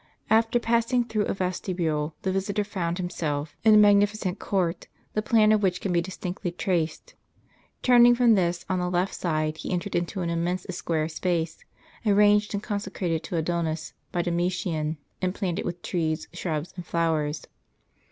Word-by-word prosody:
After 225 +2 +4
passing 235 +1 +2
through 220 -3 -1
a - - 0
vestibule, 170 -5 -2
the 190 - 0
visitor 195 +2 -1
found 180 -4 -3
himself 155 -5 -3
in 220 -1 +7
a - - +8
magnificent 205 -2 +4
court, 180 -3 -1 0.3
the 215 - +1
plan 215 -1 +4
of 215 -1 +4
which 185 -2 +1
can 190 - -2
be 170 - +3
distinctly 180 0 -4
traced. 175 - -2 0.7
Turning 245 -1 +7
from 240 -2 +5
this, 175 -3 +1
on 185 -1 0
the 180 0 -1
left 180 +2 0
side, 155 -2 -1
he 155 - -5
entered 185 +2 -2
into 175 +2 -1
an 170 -1 -1
immense 175 +2 -1
square 160 -3 -1
space, 165 -1 -2 0.4
arranged 210 0 +4
and 205 - -3
consecrated 195 -6 -2
to 170 - -3
Adonis 165 -1 -2 0.2
by 175 - 0
Domitian, 170 -3 -1 0.2
and 185 +1 -1
planted 185 0 -2
with 175 0 -5
trees, 160 -3 -1
shrubs, 165 -2 -3
and 180 - -6
flowers. 160 -3 -1
180 Hz, 160 wpm, -26 LUFS, 170-205 Hz, 0.7 s, a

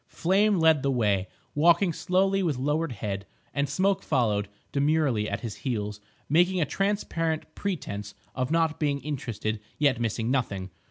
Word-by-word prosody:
Flame 200 +4 +2
led 160 -3 +5
the 140 - 0
way, 105 -7 +1 0.3
walking 170 +4 +4
slowly 195 +4 +1
with 160 -8 0
lowered 150 +4 0
head, 100 -2 -4 0.3
and 140 -1 0
Smoke 190 +7 +1
followed 110 -8 +1 0.2
demurely 140 -7 +2
at - - -3
his 115 -4 -5
heels, 105 -6 -3 0.3
making 175 +5 +3
a 160 - +3
transparent 165 -3 -1
pretence 105 - -4 0.2
of 130 -1 -1
not 160 -1 +1
being 145 -3 +1
interested, 115 -7 -3 0.2
yet 140 -5 +2
missing 115 +1 -1
nothing. 100 -8 -1
145 Hz, 150 wpm, -27 LUFS, 115-165 Hz, 0.3 s, led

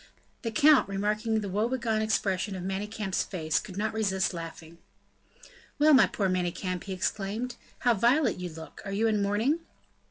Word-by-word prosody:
The 230 - -2
count, 285 +1 +5
remarking 215 +3 0
the 205 - -4
woe 210 +5 0
begone 230 -4 0
expression 200 -2 0
of 180 - -5
Manicamp's 195 +1 -2
face, 160 -4 -1
could 190 -2 -9
not 215 +1 -1
resist 195 -4 0
laughing. 165 0 -8 1.0
"Well, 305 +1 +5
my 265 - +7
poor 200 - -1
Manicamp," 180 0 -2
he 195 - -4
exclaimed, 210 +6 -2 0.3
"how 245 - +4
violet 240 +3 +2
you 180 -1 -4
look; 160 0 -10
are 195 - -5
you 215 +3 +1
in 215 -2 +2
mourning?" 215 +10 +1
205 Hz, 165 wpm, -28 LUFS, 185-225 Hz, 1.0 s, my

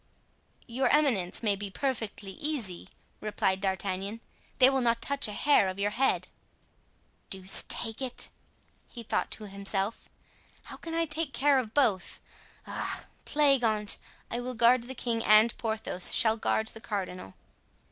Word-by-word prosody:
"Your 255 +2 0
eminence 245 -11 +1
may 205 -2 +2
be 200 0 -6
perfectly 220 -4 -3
easy," 215 - -3 0.3
replied 190 -3 -1
D'Artagnan; 195 +2 -2 0.4
"they 255 - +8
will 265 0 +2
not 235 -1 +2
touch 280 -1 +1
a - - -5
hair 205 -3 +3
of 185 - -6
your 205 +1 0
head." 265 +5 +1 1.0
"Deuce 190 0 +2
take 225 +1 +2
it!" 255 -2 -4 0.6
he 235 - -9
thought - - -1
to 215 - -4
himself, 195 +1 -3 0.5
"how - - -9
can 330 0 -6
I 330 0 +2
take 305 -1 -2
care 280 -1 +4
of 225 -4 -6
both? 225 -10 +1 0.5
Ah! - - -5 0.2
plague 280 -4 +3
on't, 215 -2 +1 0.3
I 235 - -2
will 250 +1 -5
guard 235 +2 +4
the 260 +2 -7
king 230 -2 -2
and 215 +2 +5
Porthos 220 -5 0
shall 220 -1 +4
guard 220 0 0
the 225 - -11
cardinal." 185 - -5
225 Hz, 150 wpm, -29 LUFS, 200-260 Hz, 1.0 s, they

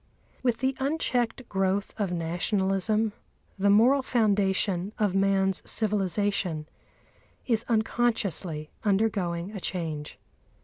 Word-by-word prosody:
With 245 -2 0
the 265 0 +1
unchecked 260 -4 -1
growth 195 +1 0
of 200 -4 -2
Nationalism 195 +5 0 0.5
the 200 +1 +3
moral 240 +7 +5
foundation 200 -5 +1
of 205 -4 +1
man's 195 -1 +2
civilisation 200 -6 -1 0.8
is 225 -3 +2
unconsciously 215 -9 0
undergoing 195 -4 0
a 210 - -6
change. 160 -5 -4
200 Hz, 95 wpm, -27 LUFS, 185-225 Hz, 0.8 s, moral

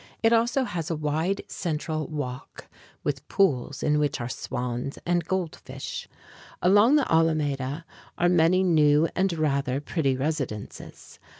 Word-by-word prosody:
It 225 +1 +5
also 240 +4 +2
has 170 -9 -4
a 165 - 0
wide 155 +6 -1
central 155 -2 -3
walk 135 -4 -6 0.4
with 145 0 -3
pools, 140 -8 +1
in 150 0 +2
which 145 -2 0
are 120 - -3
swans 125 +2 -4
and 175 0 +1
goldfish. 190 - -4 0.5
Along 205 +9 +5
the 295 - +2
Alameda 150 -2 +1 0.3
are 175 - +3
many 175 +1 +4
new 155 -3 +4
and 190 0 +2
rather 140 -4 0
pretty 145 -3 -1
residences. 135 -7 -5
155 Hz, 130 wpm, -26 LUFS, 140-180 Hz, 0.5 s, It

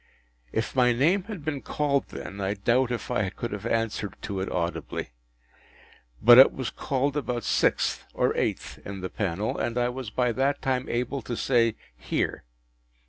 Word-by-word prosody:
If 110 - -2
my 125 -2 +4
name 170 +10 +2
had 200 -10 -7
been 145 -3 -2
called 145 -2 0
then, 100 +1 -7
I 100 +1 -1
doubt 120 +5 +2
if 120 -4 -4
I 100 -3 +1
could 120 +4 -5
have 105 +2 -4
answered 115 -4 -1
to 100 -3 -3
it 95 - -3
audibly. 85 -7 -3 1.1
But 120 +2 +9
it 135 - +9
was 130 -3 -4
called 140 +1 -1
about 125 -5 -2
sixth - - +1
or - - +1
eighth - - -2
in 100 -1 -6
the 95 - -4
panel, 100 +1 -2
and 120 +1 -1
I 120 0 +2
was 125 -2 -5
by 125 +3 +1
that 135 +4 +1
time 130 -1 -1
able 125 +3 -1
to 120 -2 -5
say, 115 -4 +2 0.2
“Here! - - -2
120 Hz, 175 wpm, -27 LUFS, 105-135 Hz, 1.1 s, But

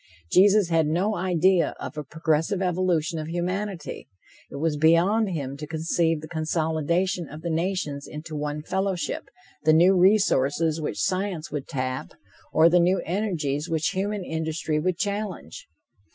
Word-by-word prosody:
Jesus 195 0 +5
had 165 -2 +2
no 185 +7 0
idea 180 0 +2
of - - -6
a 150 - -4
progressive 160 +5 0
evolution 175 -3 0
of 155 - -5
humanity. 180 +1 -4 0.4
It - - -10
was 155 +2 0
beyond 170 +8 +3
him 140 -6 -4
to 150 +1 -7
conceive 160 0 0
the 155 - -8
consolidation 160 +2 -1
of 155 +1 -10
the 170 - -2
nations 160 -4 -2
into 155 +1 -8
one 150 0 -3
fellowship, 190 0 -2 0.4
the 155 +1 +5
new 175 +4 +6
resources 165 -5 +3
which 150 - -3
science 185 -3 -1
would 145 -2 -4
tap, 130 -3 -4 0.4
or 160 +1 +6
the 175 +1 +4
new 180 +2 +3
energies 165 -6 -2
which 160 -1 0
human 200 +1 -2
industry 160 -1 -2
would 180 +2 -1
challenge. 205 - -4
165 Hz, 150 wpm, -25 LUFS, 155-185 Hz, 0.4 s, new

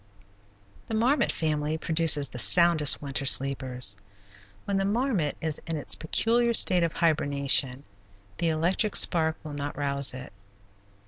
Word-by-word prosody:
The 225 - -4
marmot 250 +7 0
family 155 -1 -3
produces 160 -3 +2
the 125 - -8
soundest 170 -2 +4
winter 140 -1 -3
sleepers. 130 -5 +2 0.7
When 200 -1 -2
the 195 - -1
marmot 205 - -2
is 160 -2 -3
in 165 -1 -4
its 145 - 0
peculiar 235 +8 0
state 180 -4 +4
of 170 -1 -1
hibernation 140 -4 0 0.6
the 170 - 0
electric 175 +7 -1
spark 160 -2 +1
will 150 - -9
not 145 0 -6
rouse 140 -2 -2
it. 130 -4 -11
155 Hz, 135 wpm, -25 LUFS, 140-175 Hz, 0.7 s, soundest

